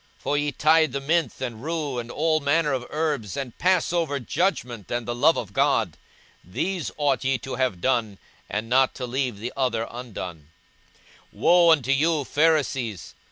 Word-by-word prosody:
for 145 - -2
ye 145 0 0
tithe 155 0 +3
mint 160 -4 +1
and 120 -3 -5
rue 150 -5 -2
and 120 0 -6
all 155 +4 +1
manner 145 +1 +1
of 125 -2 -3
herbs, 150 - -2
and 135 -4 -5
pass 180 -1 +2
over 160 -5 0
judgment 125 - -2
and 120 -1 -3
the 120 - -1
love 130 +7 +4
of 100 -4 -5
God: 135 - +2 0.5
these 175 - -3
ought 140 -5 +1
ye 130 0 +1
to 130 +3 -7
have 125 -8 -1
done, 115 -6 0 0.3
and 105 +2 -3
not 130 +2 +3
to 125 - -4
leave 125 -2 -2
the 115 +5 -5
other 120 -4 0
undone. 95 -11 -7 0.8
42:011:043 - - -19
Woe 175 0 +5
unto 140 -5 +4
you, 150 +2 +2
Pharisees! 135 - 0
135 Hz, 170 wpm, -24 LUFS, 120-155 Hz, 0.8 s, Woe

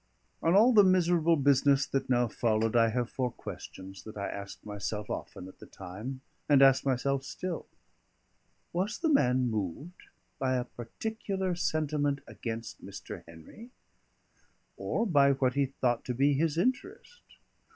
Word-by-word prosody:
On 165 +3 +3
all 230 +5 +6
the 210 -2 +8
miserable 175 -3 +3
business 140 0 +3
that 135 -1 -2
now 120 -1 +3
followed, 110 0 0
I 115 -1 +5
have 120 +1 -1
four 130 -2 -1
questions 95 -4 -9
that 110 -1 -10
I 100 - -3
asked 100 0 -8
myself 105 0 -4
often 90 - -6
at 95 - -15
the - - -12
time, 105 +9 -8 0.3
and 140 -2 +6
ask 135 -1 +5
myself 135 +1 0
still: 180 +4 -5 1.1
Was 195 +6 -1
the 325 - 0
man 125 - +3
moved 110 - -4 0.4
by 130 -1 +1
a 125 -1 -1
particular 190 - -4
sentiment 150 -4 -1
against 115 -1 -7
Mr. - - -8
Henry? 85 - -13 1.1
or 230 - -1
by 140 -8 +4
what 130 -1 +1
he 140 0 +1
thought 125 -3 -1
to 125 - -3
be 140 +3 +3
his 155 +2 0
interest? 370 - -2
135 Hz, 150 wpm, -30 LUFS, 115-170 Hz, 1.1 s, the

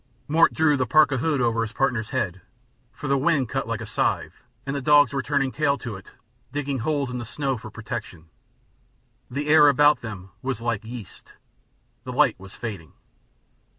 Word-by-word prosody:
Mort 165 +3 +4
drew 150 -2 +3
the 130 -1 0
parka 150 -4 +4
hood 145 0 0
over 115 -1 +1
his 110 -1 -3
partner's 120 -5 0
head, 95 -9 -2 0.5
for 135 +5 -7
the 140 0 +2
wind 135 -3 +1
cut - - -2
like - - -3
a - - -5
scythe - - -1 0.2
and 135 +1 -3
the 140 - -2
dogs 145 -1 +5
were 135 - 0
turning 135 -1 0
tail 140 -1 +1
to 120 -6 -6
it, 95 - -12 0.4
digging 140 -1 -2
holes 140 0 -1
in 125 - -4
the - - -4
snow 135 +3 -2
for 110 -2 -9
protection. 105 -7 -7 1.0
The 145 +4 -3
air 150 -1 +7
about 145 +1 +5
them 95 -5 -8
was 130 -2 -3
like 115 -3 -2
yeast; 115 -4 -10 0.7
the - - -6
light - - +3
was 95 0 -12
fading. 100 - -7
130 Hz, 185 wpm, -24 LUFS, 115-145 Hz, 1.0 s, air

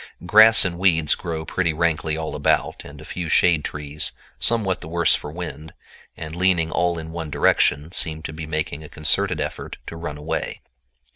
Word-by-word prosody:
Grass 110 +3 +7
and 85 -2 -3
weeds 80 -5 +4
grow 80 -2 -5
pretty 85 -2 -1
rankly 80 -1 0
all 80 -1 -4
about, - - 0
and 70 0 -12
a 80 - -11
few 85 0 -5
shade 85 -3 +3
trees, 75 0 -3 0.3
somewhat 100 - +1
the - - -8
worse 85 +1 +2
for 75 - -3
wind, 80 -2 -7 0.4
and 80 0 -7
leaning 90 -3 +2
all 85 -1 0
in 80 0 -7
one 80 -2 -5
direction, 75 +1 +2
seem 80 -3 -1
to 80 - -6
be 80 0 -7
making 80 -1 -3
a 75 - -11
concerted 75 0 0
effort - - -5
to - - -8
run 80 -3 -6
away. 75 - -4
80 Hz, 185 wpm, -22 LUFS, 75-85 Hz, 0.4 s, Grass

